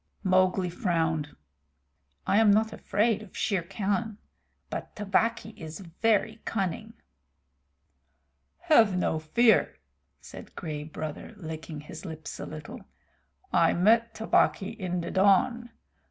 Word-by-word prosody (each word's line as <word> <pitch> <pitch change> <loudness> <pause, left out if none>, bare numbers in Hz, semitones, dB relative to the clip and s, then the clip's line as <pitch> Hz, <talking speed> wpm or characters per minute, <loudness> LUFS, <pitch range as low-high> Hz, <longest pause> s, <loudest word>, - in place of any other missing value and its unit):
Mowgli 185 -1 +2
frowned. 165 - -1 0.9
"I 200 - +2
am 220 -2 +5
not 220 +2 +3
afraid 210 +1 0
of 215 -4 -12
Shere 195 -4 0
Khan, 205 +4 -2 0.5
but - - -6
Tabaqui 215 +2 0
is 160 +1 -8
very 220 +5 0
cunning." 210 +2 -3 1.7
"Have 230 - +4
no 160 -3 0
fear," 220 +10 +3 0.4
said - - -12
Gray 155 -4 -5
Brother, 155 0 -7
licking 160 -3 -7
his 160 +1 -10
lips 160 -4 -7
a - - -5
little. 155 -1 -8 0.7
"I 165 - +4
met 225 +6 +3
Tabaqui 220 -3 +2
in 180 -3 -3
the 170 - -5
dawn. 205 +5 +3
190 Hz, 115 wpm, -28 LUFS, 160-220 Hz, 1.7 s, am